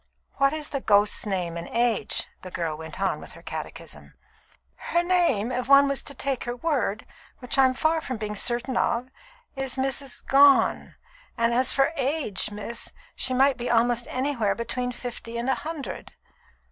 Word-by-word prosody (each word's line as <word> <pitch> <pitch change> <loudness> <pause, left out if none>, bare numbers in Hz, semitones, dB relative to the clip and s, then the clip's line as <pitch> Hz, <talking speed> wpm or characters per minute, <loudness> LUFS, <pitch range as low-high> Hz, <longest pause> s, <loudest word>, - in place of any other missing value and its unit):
"What 275 0 +4
is 305 -1 -5
the 275 - -3
ghost's 205 0 +3
name 180 -4 -2
and 170 - -6
age?" 235 -2 0 0.2
the 185 - -8
girl 165 -3 -2
went 160 +2 -9
on 195 0 0
with - - -11
her - - -14
catechism. - - -8 0.6
"Her 345 0 0
name, 345 - +2
if 250 0 -2
one 280 0 +7
was 275 -1 -1
to 285 - -8
take 275 -3 -2
her 240 0 -3
word, 245 -7 -1 0.3
which 250 - -3
I'm 260 -1 +4
far 315 +3 +1
from 255 -5 -4
being 210 0 -4
certain 240 +4 -1
of, 245 +2 0 0.5
is 270 -2 -2
Mrs. 270 0 -3
Gone; 280 0 +5 0.4
and 230 0 +2
as 255 +2 +3
for 270 - +4
her 315 - -1
age, 265 -7 -1
miss, 210 +3 -6 0.2
she 255 - -2
might 270 +1 +4
be 240 - -3
almost 240 0 +2
anywhere 255 -6 0
between 245 +2 -3
fifty 240 -1 -7
and 235 +2 -2
a 265 - +3
hundred." 315 -3 -6
250 Hz, 175 wpm, -26 LUFS, 225-275 Hz, 0.6 s, one